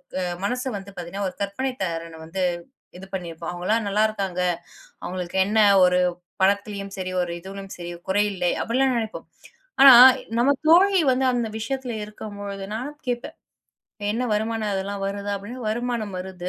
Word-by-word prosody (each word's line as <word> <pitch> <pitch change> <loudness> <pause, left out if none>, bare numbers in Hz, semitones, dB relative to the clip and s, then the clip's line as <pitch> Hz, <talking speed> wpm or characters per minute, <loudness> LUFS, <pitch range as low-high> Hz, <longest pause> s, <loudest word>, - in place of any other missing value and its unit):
க 185 - -1 0.2
மனச 250 +4 -1
வந்து 200 0 -10
பாத்தீங்கன்னா 180 +3 -4
ஒரு - - -15
கற்பனை 200 +7 -2
திறன் 165 -2 -4
வந்து 185 +3 -3 0.6
இது 190 - -9
பண்ணிப்போம். 170 -2 -5
அவங்களாம் 210 +6 0
நல்லா 210 +2 +2
இருக்காங்க, 195 -4 -3 0.6
அவங்களுக்கு 180 0 -4
என்ன. 215 +2 0 0.3
ஒரு 180 0 +3 0.4
பணத்திலயும் 200 0 0
சரி 185 -1 -4
ஒரு 175 -1 -2
இதிலும் 195 +1 -8
சரி 175 -1 -6 0.2
குறையில்லை 195 -3 +1
அப்படிலாம் 255 +2 +1
நினைப்போம். 220 -1 -5 0.5
ஆனா 270 -2 +11 0.5
நமது 270 +2 +3
தோழி 385 +3 +6
வந்து 260 +1 +1
அந்த 240 -2 0
விஷயத்தில் 250 0 -3
இருக்கும் 210 -1 -9
பொழுது 200 -1 -5
நானும் 290 +6 -6
கேப்பேன். 245 -1 -3 0.8
என்ன 245 +3 -1
வருமானம் 220 0 -1
அதெல்லாம் 195 +1 -3
வருதா? 200 +1 -3
அப்படின்னு 220 +6 -8
வருமானம் 230 -3 -2
வருது, 180 -1 -6
200 Hz, 150 wpm, -24 LUFS, 185-235 Hz, 0.8 s, ஆனா